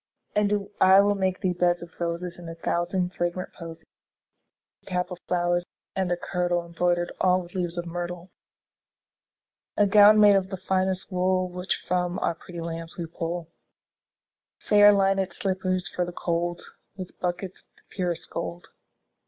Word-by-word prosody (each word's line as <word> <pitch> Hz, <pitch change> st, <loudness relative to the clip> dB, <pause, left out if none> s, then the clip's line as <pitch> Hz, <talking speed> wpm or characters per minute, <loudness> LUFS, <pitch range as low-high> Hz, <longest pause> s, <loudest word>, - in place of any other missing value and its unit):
And 205 Hz, -1 st, +1 dB
I 190 Hz, +1 st, +7 dB
will 205 Hz, 0 st, +3 dB
make 190 Hz, -2 st, -1 dB
thee 185 Hz, -3 st, +1 dB
beds 175 Hz, 0 st, +1 dB
of 170 Hz, -, -11 dB
roses 170 Hz, +1 st, -2 dB
And 175 Hz, -1 st, -9 dB
a 165 Hz, -, -7 dB
thousand 175 Hz, +2 st, -1 dB
fragrant 175 Hz, +1 st, -3 dB
posies; 165 Hz, -1 st, -10 dB, 1.0 s
10 -, -, -30 dB
A -, -, -9 dB
cap 180 Hz, +1 st, -1 dB
of 180 Hz, -, -6 dB
flowers, 175 Hz, 0 st, +1 dB, 0.3 s
and 190 Hz, -2 st, 0 dB
a 175 Hz, -, +1 dB
kirtle 175 Hz, -1 st, -1 dB
Embroider'd 175 Hz, +1 st, 0 dB
all 185 Hz, 0 st, +3 dB
with 175 Hz, -, -14 dB
leaves 175 Hz, -2 st, -3 dB
of 175 Hz, -, -2 dB
myrtle. 175 Hz, +1 st, -5 dB, 1.5 s
A 205 Hz, -, +5 dB
gown 210 Hz, +1 st, +7 dB
made 205 Hz, -1 st, +7 dB
of 190 Hz, -1 st, +1 dB
the 190 Hz, -, -4 dB
finest 190 Hz, +1 st, -1 dB
wool 185 Hz, 0 st, +1 dB
Which 180 Hz, +1 st, -2 dB
from 180 Hz, 0 st, 0 dB
our -, -, 0 dB
pretty 170 Hz, +1 st, -9 dB
lambs 165 Hz, 0 st, -6 dB
we 170 Hz, -, -3 dB
pull; 165 Hz, 0 st, -5 dB, 1.2 s
Fair 205 Hz, 0 st, +8 dB
linèd 195 Hz, -2 st, +2 dB
slippers 185 Hz, -1 st, -1 dB
for 180 Hz, -, +1 dB
the 175 Hz, -, -4 dB
cold, 175 Hz, 0 st, -2 dB, 0.3 s
15 185 Hz, -, -4 dB
With -, -, -29 dB
buckles 180 Hz, +1 st, -2 dB
of -, -, -30 dB
the -, -, -27 dB
purest 180 Hz, -3 st, -2 dB
gold. 170 Hz, +1 st, -5 dB
180 Hz, 170 wpm, -26 LUFS, 175-190 Hz, 1.5 s, Fair